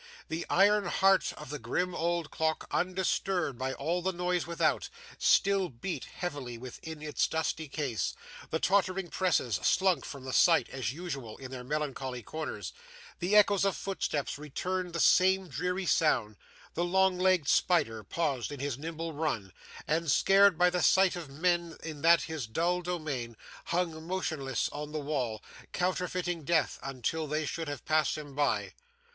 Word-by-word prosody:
The 160 +2 -3
iron 205 +1 +4
heart 195 +2 +3
of 150 -2 -10
the 150 - -4
grim 180 +10 -1
old 170 -1 -1
clock, 160 0 -1
undisturbed 180 -4 0
by 130 +1 -1
all 165 +7 -1
the 190 +2 0
noise 180 -1 -1
without, 170 -2 0 0.3
still 195 -2 +3
beat 135 +9 -5
heavily 145 -9 -5
within 150 +6 -8
its 150 -1 0
dusty 160 -1 -2
case; 125 - -2 0.3
the 160 - 0
tottering 185 -1 +1
presses 155 - +1
slunk 185 -7 +3
from 140 -2 -8
the 130 -1 -5
sight, - - +5
as 105 - -2
usual, 140 -8 -6
in 130 -1 -9
their 130 -1 -6
melancholy 135 -3 -3
corners; 105 - -5 0.5
the 185 +4 +1
echoes 205 -2 +5
of 195 -1 +1
footsteps 150 -7 -2
returned 180 +5 -3
the 170 - -2
same 190 +2 +4
dreary 180 +5 -2
sound; 120 -12 +2 0.4
the 170 - 0
long 190 +1 +2
legged 185 -5 +3
spider 145 -14 +2
paused 140 - -2
in 145 - -6
his 140 -2 -3
nimble 165 +1 -5
run, 130 - -2 0.3
and, 165 +1 0
scared 195 +2 +5
by 180 +1 +4
the 180 0 0
sight 190 +2 +4
of 170 -5 -7
men 170 +3 0
in 155 -3 -6
that 165 +1 +6
his 160 -8 -4
dull 170 +9 0
domain, 150 -10 -4 0.3
hung 165 -2 -2
motionless 155 -8 -1
on 150 +1 -6
the 155 - -1
wall, 130 -7 -2 0.3
counterfeiting 180 -2 -1
death 165 +2 +1
until 135 +4 -3
they 155 +1 -1
should 165 +2 -4
have 145 0 -6
passed 155 0 +2
him 145 -2 -8
by. 145 +1 0
160 Hz, 160 wpm, -30 LUFS, 140-180 Hz, 0.5 s, that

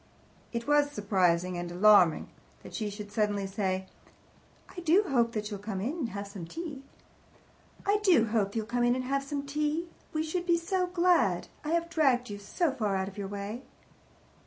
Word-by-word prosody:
It 235 -1 -3
was 290 0 +3
surprising 185 -6 +1
(and 175 0 -5
alarming) 180 -3 +5 0.3
that - - -11
she 215 -2 -2
should 205 0 -8
suddenly 205 -2 0
say, 190 -1 -2 0.9
"I - - -5
do 350 +4 +4
hope 240 - +1
that 215 0 -3
you'll 205 - -4
come 205 -1 -4
in 235 +10 -2
and 305 -9 -3
have 200 0 -5
some 195 -5 -8
tea." 300 - -6 1.0
"I 405 +1 +3
do 350 - +5
hope 210 -3 +2
that 200 - -14
you'll 220 -1 -1
come 240 +2 0
in 240 0 +3
and 255 - -2
have 275 +2 -1
some 280 0 -4
tea. 300 +4 -1 0.2
We 310 0 -1
should 350 +3 -3
be 340 -1 +4
so 365 +2 0
glad. 360 0 +2
I 300 - -4
have 335 0 +1
dragged 265 -8 +2
you 205 - -6
so 285 - 0
far 215 -7 -1
out 190 0 -1
of 195 - -15
your 200 - -3
way." 205 +4 -5
235 Hz, 195 wpm, -29 LUFS, 200-310 Hz, 1.0 s, alarming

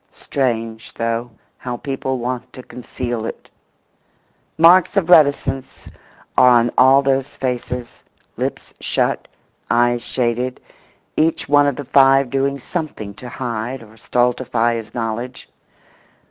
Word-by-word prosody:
Strange, 115 -4 -3
though, 115 +1 -2 0.3
how 125 -1 -5
people 135 -1 -3
want 125 +1 -4
to 130 - -10
conceal 120 -2 -5
it! - - -7 1.1
Marks 175 +4 +5
of 180 -3 +1
reticence 140 -4 +3 0.5
are 125 - +6
on 120 -1 +4
all 135 +2 +6
those 135 +1 0
faces: 125 -1 -4 0.3
lips - - -4
shut, - - -1 0.4
eyes 120 0 +2
shaded, 125 +1 -2 0.6
each 160 +1 +1
one 145 0 +4
of 140 - 0
the 145 - -7
five 135 -1 +4
doing 135 0 0
something 140 - -5
to 120 +5 -10
hide 120 0 -4
or 110 0 -17
stultify 120 0 0
his 110 -1 -6
knowledge. 120 +2 -4
125 Hz, 120 wpm, -19 LUFS, 120-135 Hz, 1.1 s, are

